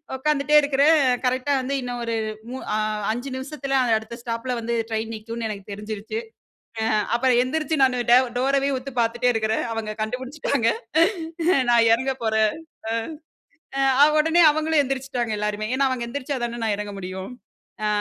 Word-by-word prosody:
உட்காந்துட்டே 300 +2 +1
இருக்கறேன், 285 +3 +4 0.3
கரெக்ட்டா 255 +3 +1
வந்து 270 +2 -3
இன்னும் 245 -1 -4
ஒரு 230 0 -1 0.4
மு 260 - -4 0.2
அ - - +1 0.3
5 245 +4 -4
நிமிஷத்துல 270 0 -2 0.2
அடுத்த 220 +2 -8
ஸ்டாப்ல 235 +1 -3
வந்து 235 +1 -2 0.2
ட்ரெயின் 220 +1 -2
நிக்கும்னு 230 +1 -5
எனக்கு 200 -1 -7
தெரிஞ்சுடுச்சு. 210 - -5 0.6
அ 220 - 0 0.3
அப்புறம் 245 0 +3
எந்திரிச்சு 310 +4 -1
நா 265 - +8 0.3
டே 245 - +9 0.2
டோரவே 275 +2 +2
உத்து 265 +2 -7
பாத்துட்டே 240 +2 +1
இருக்கறேன். 220 0 0
அவங்க 215 -1 -4
கண்டுபிடிச்சுட்டாங்க. 255 +2 -1 1.0
நா - - +5 0.2
எறங்க 260 +3 -2
போறேன். 220 -1 +2 0.4
அ. - - 0 0.9
அ, 270 +2 +5
உடனே 325 +3 +4
அவங்களும் 310 0 +2
எந்திரிச்சுட்டாங்க 260 -3 -3
எல்லாருமே. 210 0 -2
ஏனா, 275 +1 +2
அவங்க 250 -2 -2
எந்திரிச்சா 280 +1 -3
தானே, 235 0 -5
நா - - 0
எறங்க 205 0 -5
முடியும். 185 +3 -6 0.5
ஆ - - +2
250 Hz, 150 wpm, -23 LUFS, 225-275 Hz, 1.0 s, டே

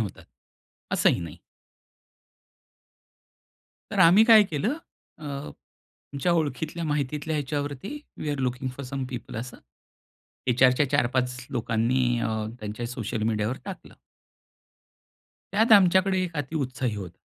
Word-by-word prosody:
होतात, 100 -5 -5 0.7
असंही - - +3
नाही. 85 -1 -7 2.5
तर 200 - -3
आम्ही 185 +5 +7
काय 225 -2 +8
केलं, 190 - -1 0.5
अ, 155 - -11 0.9
आमच्या 140 +5 +1
ओळखीतल्या 160 +1 -1
माहितीतल्या 150 +1 -1
ह्याच्यावरती, 145 - -3 0.2
we 155 - -4
R 145 - -2
looking 130 0 -1
for 140 - -6
some 135 0 -3
people, 120 -3 -7
असं, 125 +2 -6 0.9
एच 125 +1 +2
आरच्या 130 +2 +5
4-5 125 -2 +1
लोकांनी 120 +1 +1 0.2
अ, 115 - -1 0.3
त्यांच्या 110 +3 -5
सोशल 115 -2 -4
मिडियावर 110 +2 0
टाकलं. 195 -2 -9 1.6
त्यात 220 +3 +4
आमच्याकडे 190 -1 +5
एक 175 -2 -4
अति 145 +2 -3
उत्साही 130 -4 -2
होता. 90 -4 -7
135 Hz, 120 wpm, -26 LUFS, 120-160 Hz, 2.5 s, काय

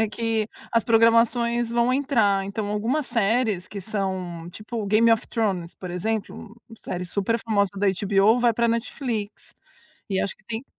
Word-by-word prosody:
É 220 - +2
que 225 -1 -1 0.2
as 230 -2 +3
programações 230 +1 +3
vão 240 +1 +2
entrar, 225 -8 +2
então 205 +1 -4
algumas 235 +8 -1
séries 220 -4 0
que 200 - -6
são, 185 -4 -4
tipo 220 +3 -6
Game 220 +3 +4
of 225 - 0
Thrones, 190 -7 -1
por 180 -2 -8
exemplo, 220 +3 -4 0.2
série 180 0 -5
superfamosa 200 +1 0
da 200 +1 +1 0.2
HBO, 200 +4 +4
vai 240 -1 +4
pra 235 +1 +1
Netflix. 230 -2 -3 0.6
E 190 - +1
acho 200 - -3
que 215 - -30
tem 230 +3 -4
220 Hz, 155 wpm, -24 LUFS, 200-235 Hz, 0.6 s, Game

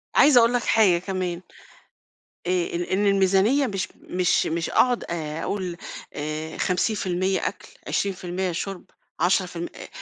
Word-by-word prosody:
عايزة 280 -4 +7
أقول 230 +1 +4
لك 245 - +1
حاجة 200 -6 +4
كمان. 185 -2 -3 1.1
آآ، - - 0
آآ، 175 0 -1
إن 205 +2 +2
الميزانيّة 195 +8 +3
مش 195 -3 -2
مش 180 -1 0
مش 165 +1 -1
أقعد 250 -1 +3
آآ، 160 -2 -4
أقول، 185 -4 -3 0.4
آآ 155 +2 -4
50% 185 -1 0
أكل - - -6 0.2
20% 185 -1 -1
شرب، 185 +2 -5 0.3
10% 175 -1 +1
أ - - -9
185 Hz, 130 wpm, -24 LUFS, 175-200 Hz, 1.1 s, عايزة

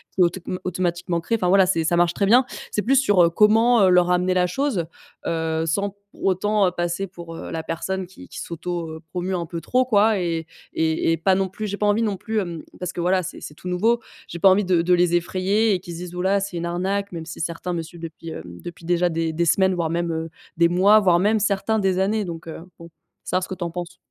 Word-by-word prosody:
c'est 185 - +4
autom 180 +1 -2
automatiquement 175 -1 -1
créé. 225 +7 -1
Enfin, 180 -4 0
voilà, 190 0 +6
c'est 175 -3 +1
ça 170 +2 +1
marche 175 0 +3
très 200 - 0
bien. 245 +6 +5 0.3
C'est 210 - -1
plus 270 +3 +3
sur, 205 -9 +4
heu, 170 - +5
comment, 220 +5 +4
heu, 190 - +5
leur 180 0 +4
amener 180 +1 +2
la 180 -1 +2
chose, 225 - -1 0.4
heu, 160 -1 -1
sans 200 +4 -1 0.2
autant 195 +1 +1
passer 175 +2 -2
pour, 170 -2 -10
heu, - - -7
la 160 - -3
personne 185 +4 -3
qui 185 - -14
qui - - -8
s'auto-promeut 170 +1 -4
un - - -4
peu 165 +1 -5
trop, 255 +7 +1
quoi 215 -3 +3
et 165 -2 -2 0.3
et 160 0 +1
et - - -1
pas 190 +4 +2
non 190 0 +1
plus 215 +3 -6
j'ai 200 0 -4
pas 210 - 0
envie 205 +2 +2
non 210 -3 0
plus, 220 +2 -2
hem, 170 -5 -4 0.2
parce 180 -1 -3
que, - - -6
voilà, 185 +1 +2
c'est - - -7
c'est - - -8
tout 180 - -10
nouveau. 225 +7 +2 0.3
J'ai 170 - -7
pas 195 - +7
envie 190 +1 +3
de 180 -2 +3
de 180 +1 +2
les 175 -1 +3
effrayer 195 +5 +1
et 185 - 0
qu'ils 175 -1 -9
se 165 - -7
disent: 180 0 -7
«Ouh 180 - -3
là, 195 +2 +2
c'est 195 -3 -4
une 170 - -3
arnaque!» 195 +4 -2
même 165 -1 -6
si 160 - -9
certains 170 +2 -3
me 170 - -2
suivent 165 +1 -11
depuis, 165 0 -8
heu, - - -6
depuis 90 - -10
déjà 175 +1 +2
des 165 0 -1
des 170 +2 0
semaines, 190 +2 +3
voire 170 -3 -1
même, 170 +1 -1
heu, 160 0 -3 0.3
des 170 0 +5
mois, 190 +5 +5
voire 180 -4 +4
même, 210 +4 +2
certains, 210 +2 +1
des 190 -2 +1
années, 210 +3 +1
donc 165 -2 -7
heu, 160 - -7 0.2
bon, 170 0 -12 0.3
savoir 185 - 0
ce - - -4
que 190 - -4
tu 180 - -5
en 170 - -3
penses. 175 0 -6
180 Hz, 255 wpm, -23 LUFS, 170-195 Hz, 0.4 s, pas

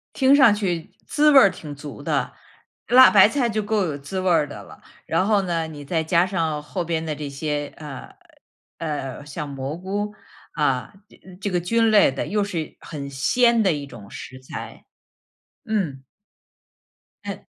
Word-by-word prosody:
听 270 +1 +5
上 265 -7 +7
去 180 -6 -2 0.2
滋 300 0 +4
味 280 - +9
儿 200 - +7
挺 155 -5 -9
足 145 +1 -9
的， - - -1 0.5
辣 255 +1 +8
白 200 -1 +8
菜 245 -1 0
就 215 -1 -1
够 210 -1 0
有 150 -4 -3
滋 145 +7 -5
味 185 0 0
儿 160 -4 +3
的 145 - -9
了。 - - -15 0.2
然 165 +3 +1
后 210 -1 +3
呢， 170 -3 -1
你 150 -2 -9
再 160 +2 0
加 170 +2 +3
上 165 -6 -1
后 175 +5 -4
边 165 -1 -2
的 155 -1 -3
这 145 -1 -6
些， 145 +1 -3
呃， 150 -4 -9 0.6
呃， 145 -4 -5
像 150 +1 -6
蘑 140 +2 -5
菇， 205 +3 -3 0.4
啊， 145 +2 0
这 - - -21 0.2
这 200 - -1
个 180 - +1
菌 225 +5 +2
类 205 -9 +6
的， 135 - -4
又 210 0 0
是 170 -6 -4
很 140 -3 -7
鲜 235 - +3
的 195 -4 +3
一 145 -1 -5
种 105 -7 -12
食 130 - -9
材。 130 - -9 0.8
嗯。 185 - -2 1.2
诶。 - - -6
165 Hz, 190 characters per minute, -23 LUFS, 145-205 Hz, 1.2 s, 味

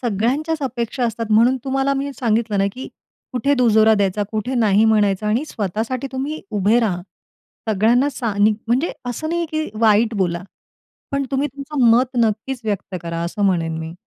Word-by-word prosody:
सगळ्यांच्याच 265 +8 -1
अपेक्षा 245 0 -2
असतात 230 0 -3
म्हणून 235 +5 +4
तुम्हाला 270 +1 0
मी 280 +1 -3
सांगितलं 220 -3 +1
ना, 195 - +3
की 260 - -8 0.4
कुठे 275 +3 +1
दुजोरा 220 -4 +4
द्यायचा, 200 0 0
कुठे 220 +4 -2
नाही 215 -3 +3
म्हणायचं 210 -2 +2
आणि 230 +8 +1
स्वतःसाठी 225 - -3
तुम्ही 285 +4 -3
उभे 210 +2 +2
राहा. 190 -6 0 0.7
सगळ्यांना 230 +7 +3
सा 235 -5 -3
नी 205 +1 +5 0.2
म्हणजे 260 +8 +1
असं 245 +6 -3
नाहीये 340 0 -1
की 310 0 -1
वाईट 220 +1 +4
बोला, 175 -4 -1 0.7
पण 275 0 0
तुम्ही 275 +2 +1
तुमचं 280 -1 -2
मत 250 +2 +3
नक्कीच 230 +3 0
व्यक्त 200 -3 -3
करा, 170 0 -4
असं 205 +4 -3
म्हणेन 165 -4 0
मी. 160 +1 -6
230 Hz, 165 wpm, -20 LUFS, 205-265 Hz, 0.7 s, नी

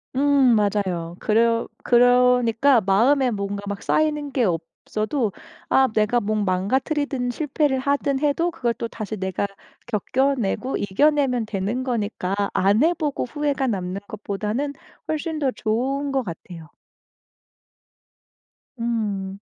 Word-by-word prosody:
음 275 -3 +4
맞아요. 190 -5 0
그러 230 +1 +2 0.2
그러니까 245 0 +4
마음에 245 +8 +3
뭔가 200 -2 -3
막 200 0 -5
쌓이는 300 -2 0
게 255 -3 +1
없어도 215 - -2 0.4
아 265 0 +5
내가 215 +3 +2
뭐 215 -1 -1
망가뜨리든 245 +7 0
실패를 285 +1 0
하든 280 0 0
해도 300 +4 +1
그걸 240 -7 -1
또 230 - -4
다시 215 -1 -6
내가 190 0 -2 0.4
겪어내고 255 +2 0
이겨내면 250 +3 +2
되는 215 +4 -2
거니까 215 -6 -2 0.2
안 200 +7 +3
해 335 +2 +4
보고 300 -5 -2
후회가 285 0 -1
남는 190 -3 -3
것보다는 215 +7 -3 0.3
훨씬 315 0 -2
더 275 -3 +1
좋은 265 +6 -1
것 270 -1 0
같아요. 170 -3 -9 2.1
음. 205 -5 -2
235 Hz, 250 characters per minute, -23 LUFS, 205-275 Hz, 2.1 s, 아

